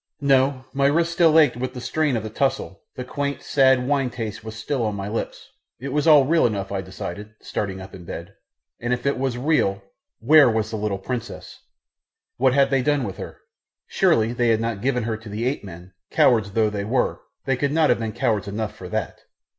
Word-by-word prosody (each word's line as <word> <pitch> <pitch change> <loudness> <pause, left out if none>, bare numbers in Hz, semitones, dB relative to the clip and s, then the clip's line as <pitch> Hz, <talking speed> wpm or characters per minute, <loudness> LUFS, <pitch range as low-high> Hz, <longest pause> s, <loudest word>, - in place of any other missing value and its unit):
No, 135 -2 +2
my 140 0 +2
wrists 170 +4 +1
still 165 -2 +4
ached 150 -7 +5
with 130 +1 -4
the - - -5
strain 150 0 0
of 110 - -4
the 110 - -6
tussle, 110 -8 -2
the 125 - -5
quaint, 140 +2 -4
sad 130 -2 +3
wine 135 -2 +1
taste 110 -3 -6
was 110 0 -8
still 120 +3 -2
on 105 -2 -1
my 100 0 -5
lips 110 +2 -5 0.3
it 135 +3 -5
was 150 +1 +1
all 150 -4 +7
real 160 -1 +3
enough, 100 -3 -4
I 95 -1 -2
decided, 95 +3 -8
starting 95 -2 -4
up 95 +1 -10
in 90 - -10
bed; 85 +3 -8 0.5
and 120 +1 -1
if 125 +1 -4
it 140 -2 0
was 130 -2 -1
real 120 -9 +1 0.4
where 145 +3 +6
was 110 -1 -1
the - - -3
little 105 -2 -2
princess? 120 +4 -6 0.8
What 130 0 +3
had 140 -1 +3
they 135 -1 +3
done 145 +1 +1
with 95 -5 -5
her? - - -9 0.4
Surely 115 +1 +2
they 120 0 +1
had 115 -1 +3
not 115 -3 -3
given 125 -1 0
her 110 -1 -2
to 110 0 -12
the 110 +3 -3
ape 130 -1 -1
men 90 -1 -11 0.2
cowards 110 -5 +3
though 110 -1 +2
they 100 -1 -3
were 120 +5 0 0.2
they 135 - +1
could 140 +2 -1
not 155 -2 +3
have 120 - +1
been 110 -1 -3
cowards 105 -1 -1
enough 105 +1 -4
for - - -9
that. - - -3
120 Hz, 220 wpm, -23 LUFS, 105-135 Hz, 0.8 s, all